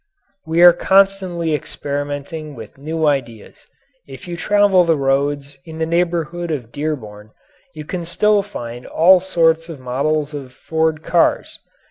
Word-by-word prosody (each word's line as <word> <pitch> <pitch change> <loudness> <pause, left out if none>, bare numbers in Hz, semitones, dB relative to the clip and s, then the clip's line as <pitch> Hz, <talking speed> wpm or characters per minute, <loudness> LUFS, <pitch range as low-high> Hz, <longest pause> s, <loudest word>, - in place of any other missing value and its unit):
We 165 +2 +3
are 175 -1 +9
constantly 190 -3 +2
experimenting 145 +1 -5
with 115 +2 -12
new 160 +2 -2
ideas. 125 -7 -3 0.4
If 135 +3 -11
you 175 - -5
travel 200 0 +3
the 165 -2 +2
roads 140 +1 -1
in 160 -1 -10
the 160 - -1
neighbourhood 170 0 -1
of 130 -7 -4
Dearborn 115 -9 -5 0.5
you 155 -1 -8
can 175 +2 -4 0.4
find 120 - -8
all 180 +3 +5
sorts 165 -3 +1
of 160 -4 -8
models 145 +4 -1
of 135 -3 -8
Ford 160 +1 -1
cars. 170 0 +1
155 Hz, 135 wpm, -19 LUFS, 140-170 Hz, 0.5 s, are